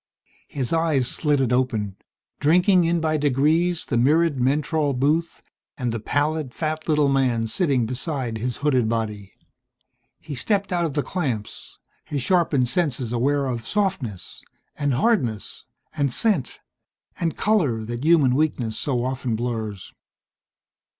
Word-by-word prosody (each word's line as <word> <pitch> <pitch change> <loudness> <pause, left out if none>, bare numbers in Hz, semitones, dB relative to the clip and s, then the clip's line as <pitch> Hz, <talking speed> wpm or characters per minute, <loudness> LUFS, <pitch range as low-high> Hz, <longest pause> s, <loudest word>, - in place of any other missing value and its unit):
His 135 +1 -3
eyes 160 -6 +2
slitted 135 -4 +2
open, 110 -6 0 0.4
drinking 180 +4 +4
in 170 +1 +1
by 155 -1 +1
degrees 155 +5 +1
the 120 - -1
mirrored 150 +3 +3
mentrol 145 +2 +1
booth 155 +5 0 0.3
and 125 -3 -2
the 115 - -3
pallid, 145 +3 -1
fat, 155 0 -3
little 150 -2 +3
man 130 -4 +1
sitting 135 - +1
beside 125 -1 -3
his 125 +1 -3
hooded 130 -6 +2
body. 105 -4 -3 0.9
He 150 - -8
stepped 195 - -1
out 175 -1 +1
of 150 - -4
the 145 - +1
clamps, 130 - -4 0.3
his 140 -4 -3
sharpened 160 -7 +2
senses 130 -4 0
aware 140 +4 +1
of 120 -3 -4
softness, 165 - -2 0.3
and 145 -3 0
hardness, 125 - 0 0.3
and 140 -4 0
scent, 190 - 0 0.6
and 165 -2 -1
color 145 - +1
that 120 +3 -5
human 155 -6 +4
weakness 130 -6 0
so 125 -4 -1
often 130 -3 -2
blurs. 110 -4 -4
140 Hz, 135 wpm, -23 LUFS, 120-160 Hz, 0.9 s, drinking